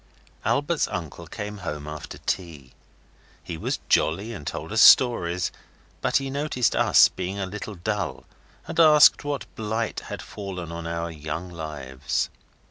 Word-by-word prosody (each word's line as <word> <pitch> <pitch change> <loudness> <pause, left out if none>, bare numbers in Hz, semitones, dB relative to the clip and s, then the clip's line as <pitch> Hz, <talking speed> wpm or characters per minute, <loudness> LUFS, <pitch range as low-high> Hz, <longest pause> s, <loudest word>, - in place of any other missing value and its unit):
Albert's 145 +3 +1
uncle 85 -1 -6
came 105 +1 -6
home 75 -5 -5
after 75 0 -7
tea. 80 -9 -4 0.7
He 85 - -5
was 80 - -2
jolly, 100 +9 +1
and 75 -9 -8
told 80 0 -5
us 110 - +3
stories, 90 -8 +6 0.5
but - - +2
he 135 -1 -3
noticed 140 -4 0
us - - +6
being 95 +2 -5
a 100 - -2
little 105 +2 -6
dull, 105 +3 -3 0.4
and - - -4
asked 155 -2 +7
what 145 -1 -3
blight 110 +1 -2
had - - -7
fallen 90 -5 -7
on 85 0 -5
our 85 0 -3
young 80 +3 -5
lives. 75 -4 -3
90 Hz, 145 wpm, -25 LUFS, 80-110 Hz, 0.7 s, asked